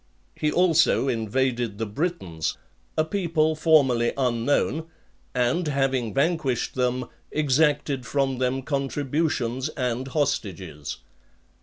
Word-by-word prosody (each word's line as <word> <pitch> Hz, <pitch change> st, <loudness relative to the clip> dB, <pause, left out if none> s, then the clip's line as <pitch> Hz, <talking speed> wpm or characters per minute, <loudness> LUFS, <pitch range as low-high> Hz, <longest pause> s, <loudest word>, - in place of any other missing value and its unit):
He 150 Hz, -, 0 dB
also 165 Hz, -6 st, +3 dB
invaded 120 Hz, -1 st, 0 dB
the 115 Hz, -, -2 dB
Britons, 105 Hz, -, -2 dB, 0.4 s
a 155 Hz, -, +3 dB
people 160 Hz, -3 st, +1 dB
formerly 140 Hz, -7 st, +3 dB
unknown, 130 Hz, +5 st, +1 dB, 0.5 s
and 125 Hz, +8 st, +1 dB
having 135 Hz, -5 st, 0 dB
vanquished 140 Hz, -4 st, 0 dB
them, 125 Hz, 0 st, 0 dB, 0.3 s
exacted 145 Hz, -2 st, +2 dB
from 135 Hz, 0 st, 0 dB
them 130 Hz, +1 st, 0 dB
contributions 140 Hz, -2 st, -1 dB
and 125 Hz, -2 st, -2 dB
hostages. 95 Hz, -, -2 dB
135 Hz, 100 wpm, -25 LUFS, 120-155 Hz, 0.5 s, also